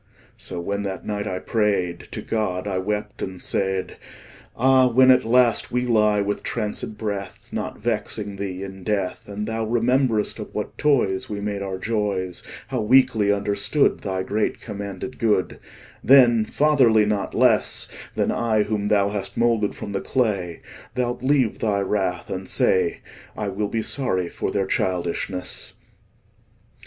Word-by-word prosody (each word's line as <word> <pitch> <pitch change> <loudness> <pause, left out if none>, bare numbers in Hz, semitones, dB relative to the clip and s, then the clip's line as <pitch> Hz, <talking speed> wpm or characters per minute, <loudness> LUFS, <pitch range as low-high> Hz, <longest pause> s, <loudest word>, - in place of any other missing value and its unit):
So 90 - -5
when 100 +4 -2
that 95 -2 -5
night 105 0 -3
I 95 - -2
pray'd 100 -5 -1
To - - -6
God, 105 -4 -2
I 95 -2 -1
wept, 105 +2 -3
and 95 -1 -5
said: 95 0 -2 0.6
Ah, 130 +1 +5
when 130 +2 +6
at 125 0 +5
last 120 +1 +3
we 125 0 0
lie 105 -3 +3
with 100 0 -2
trancèd 105 -1 -3
breath, 100 -3 -5
Not - - -4
vexing 105 -2 -2
Thee 95 -1 -4
in 95 -1 -8
death, 100 -2 -2
25 - - -25
And 105 0 -2
Thou 115 0 -2
rememberest 120 -1 +1
of - - -8
what - - -4
toys 120 -11 +2
We 105 -1 -4
made 100 -1 -3
our 95 -1 -3
joys, 100 -4 -2 0.3
How - - -1
weakly 110 -3 +4
understood 100 +7 +1
Thy 95 -2 -3
great 105 +3 -1
commanded 100 +3 -6
good, 105 -5 +1 0.4
Then, 120 -4 +6
fatherly 130 -8 +4
not 105 -1 -1
less - - +3
30 - - -14 0.2
Than - - +1
I 110 -3 +1
whom 105 -1 -2
Thou 100 -1 +3
hast 100 -1 -4
moulded 115 -3 +2
from 100 - -6
the 100 - -2
clay, 100 -9 -1 0.3
Thou'lt 120 -1 -1
leave 130 -4 +2
Thy 105 -2 +1
wrath, 95 -3 -1
and 95 0 -4
say, 95 -2 +2 0.4
'I 105 -2 -2
will 100 +1 -2
be 110 0 -1
sorry 95 -11 -1
for - - -3
their 100 -1 0
childishness. 90 0 -2
105 Hz, 160 wpm, -23 LUFS, 95-115 Hz, 0.6 s, when